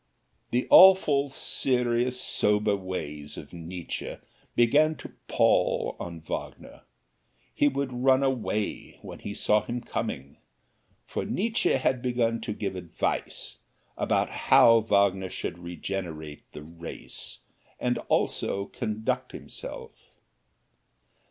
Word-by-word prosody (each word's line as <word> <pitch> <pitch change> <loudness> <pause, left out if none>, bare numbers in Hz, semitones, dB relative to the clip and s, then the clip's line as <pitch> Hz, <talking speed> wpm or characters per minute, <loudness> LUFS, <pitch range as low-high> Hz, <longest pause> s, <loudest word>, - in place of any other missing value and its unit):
The 125 +1 0
awful, 155 -7 +7
serious, 125 -2 0
sober 105 -4 +2
ways 75 -6 -6
of - - -10
Nietzsche 85 0 -6 0.4
began 150 +7 +4
to - - -11
pall - - +2
on 85 -2 -6
Wagner 80 - -7 0.7
he 145 - +3
would 140 -2 -1
run 130 +2 +3
away 120 -6 -2
when - - -9
he 100 - -6
saw 105 0 +2
him 120 +1 -3
coming, 70 - -5 0.7
for - - -3
Nietzsche 225 +4 +1
had 130 -1 +1
begun 120 -2 0
to 115 -1 -4
give 100 -2 -3
advice 85 -8 -3 0.4
about - - +1
how 115 0 +6
Wagner 100 -3 +2
should 85 - -5
regenerate 85 -3 -6
the 75 - -9
race, 85 +1 -8 0.4
and - - 0
also 100 0 0
conduct 110 +2 -3
himself. - - -8
110 Hz, 110 wpm, -27 LUFS, 90-125 Hz, 0.7 s, awful